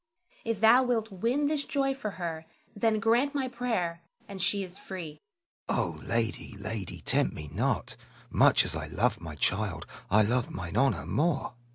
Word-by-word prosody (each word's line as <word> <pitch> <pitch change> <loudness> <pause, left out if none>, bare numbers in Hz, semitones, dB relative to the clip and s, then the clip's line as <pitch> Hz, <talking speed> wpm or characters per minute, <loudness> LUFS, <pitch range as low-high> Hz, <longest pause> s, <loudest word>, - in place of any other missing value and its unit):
If 230 -3 -2
thou 225 +3 +7
wilt 230 -4 0
win 235 +10 0
this 290 0 +1
joy 275 -1 0
for 265 -6 -4
her, 165 -3 -4 0.3
then 215 +1 +2
grant 240 +6 +2
my 270 -2 0
prayer, 225 -10 -2 0.3
and 195 -2 -6
she 200 +2 +2
is 185 0 -9
free. 165 -6 -7 0.5
Selim. - - +1
Oh, - - -2
lady, 115 -1 -1
lady, 100 -2 -5
tempt - - +1
me 75 -1 -7
not! - - 0 0.4
much - - +5
as - - -1
I 80 -1 -4
love 105 +6 0
my 80 -3 -7
child, 95 +2 -1 0.2
I 105 +2 +5
love 120 +3 +1
mine 90 +1 -6
honor 135 +4 +2
more. 155 -3 0
175 Hz, 175 wpm, -29 LUFS, -, 0.5 s, thou